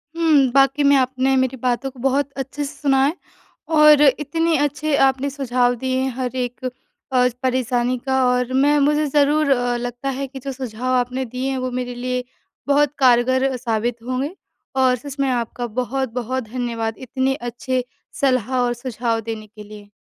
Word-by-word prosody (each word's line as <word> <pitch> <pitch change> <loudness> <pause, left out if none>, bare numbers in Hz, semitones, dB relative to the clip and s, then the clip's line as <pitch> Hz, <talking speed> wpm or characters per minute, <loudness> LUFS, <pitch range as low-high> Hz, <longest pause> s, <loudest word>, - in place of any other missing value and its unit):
हुँ। 305 -6 +3
वाक़ई 275 +1 +4
में 280 0 +5
आपने 260 0 +2
मेरी 260 0 0
बातों 250 +2 -1
को 255 - -17
बहुत 270 +2 0
अच्छे 275 +2 -4
से 285 +1 -5
सुना 270 -2 +3
है 300 +4 0 0.6
और 300 -1 +7
इतने 310 +4 +2
अच्छे 290 +1 0
आपने 270 +1 0
सुझाव 250 -3 +1
दिए 260 +2 -1
हैं। 265 0 0
हर 255 -1 -3
एक 250 0 -4 0.5
अ, 250 -1 +4
परेशानी 255 -1 0
का 265 -1 +2
और 250 0 0
मैं 285 +3 +3
मुझे 300 +1 +2
ज़रूर 290 +1 +3 0.3
लगता 245 +2 -4
है 270 +1 -3
कि 270 +1 -9
जो 270 +1 -5
सुझाव 255 0 -3
आपने 255 +1 0
दिए 255 +2 -3
हैं। 265 - -2
वो 255 0 -2
मेरे 245 0 -4
लिए 250 +1 -3 0.4
बहुत 290 0 +3
कारगर 260 +1 +3
साबित 235 -1 -1
होंगे। 260 +6 -2 0.4
और 260 -1 +3
सच 275 +3 -9
में 275 - +2
आपका 240 0 -2
बहुत-बहुत 250 +1 -3
धन्यवाद, 230 -1 -3
इतने 260 +1 -1
अच्छे 250 0 -3 0.4
सलाह 260 -3 +1
और 245 -1 +1
सुझाव 235 -2 -2
देने 220 -1 -6
के 210 0 -13
लिए। 205 0 -12
260 Hz, 170 wpm, -21 LUFS, 245-275 Hz, 0.6 s, और